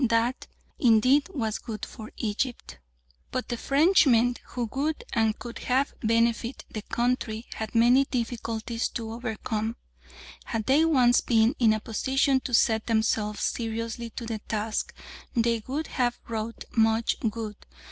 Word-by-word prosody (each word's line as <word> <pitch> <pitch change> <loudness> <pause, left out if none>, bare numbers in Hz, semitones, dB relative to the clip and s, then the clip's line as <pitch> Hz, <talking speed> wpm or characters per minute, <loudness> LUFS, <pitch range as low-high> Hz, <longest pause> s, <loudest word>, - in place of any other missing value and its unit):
That, 230 +3 +1 0.3
indeed, 255 - +4
was 230 - -2
good 215 -2 -6
for 220 -1 -10
Egypt. 225 - -3 0.5
But 255 - -3
the 240 - -1
Frenchmen 275 -4 +4
who 240 -2 -3
would 300 +3 -1
and 220 -1 +2
could 240 -1 -8
have 265 +3 +2
benefited 230 +2 +1
the 215 - -4
country 235 -1 -1
had 220 +1 -6
many 245 +4 +5
difficulties 230 -2 -2
to 225 -1 -4
overcome; 225 -1 -3 0.7
had 225 -3 -3
they 290 +6 +4
once 255 -6 +4
been 225 0 +3
in 230 -3 +5
a 215 - +1
position 265 +5 +1
to 255 - -6
set 220 -1 +2
themselves 220 -2 +1
seriously 230 0 -3
to 235 - -5
the 225 -1 -3
task, 215 0 -2 0.4
they 230 -1 +2
would 295 +5 -2
have 245 -4 -1
wrought 225 0 -4
much 225 0 +2
good. 215 -1 -5
230 Hz, 140 wpm, -27 LUFS, 220-250 Hz, 0.7 s, many